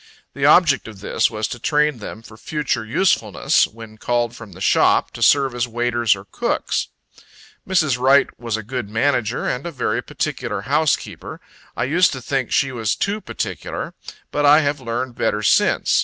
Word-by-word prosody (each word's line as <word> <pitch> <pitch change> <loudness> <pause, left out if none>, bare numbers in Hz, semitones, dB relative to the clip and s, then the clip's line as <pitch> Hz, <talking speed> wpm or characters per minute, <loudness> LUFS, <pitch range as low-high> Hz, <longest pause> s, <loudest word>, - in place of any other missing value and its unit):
The - - +1
object - - +4
of 105 -3 -11
this - - +1
was 110 -1 -3
to 120 - -6
train 150 0 +1
them 110 +1 -8
for 110 - -13
future 145 0 -2
usefulness, 110 - +2
when 110 -1 -13
called 120 0 -1
from 110 -5 -11
the 90 - -13
shop, 95 - +3
to - - -10
serve 135 -3 +4
as 120 0 -1
waiters 120 -2 +1
or 95 0 -12
cooks. - - -2 0.8
Mrs. 155 -9 +2
Wright 135 +2 +5
was 115 -2 -2
a 110 - -6
good 120 -1 -5
manager, 120 0 0
and 125 +2 -2
a - - -5
very 125 -5 -1
particular 130 -7 -3
housekeeper. 145 +7 -1 0.4
I 115 - 0
used 170 +8 +3
to 130 - -5
think 135 0 -2
she 135 - +2
was 115 -3 -1
too 205 +2 -2
particular. - - -5 0.4
But 145 - -1
I 145 +2 +7
have 145 -1 -1
learned 120 +1 -3
better 105 -2 -1
since. - - +3
120 Hz, 175 wpm, -20 LUFS, 110-140 Hz, 0.8 s, I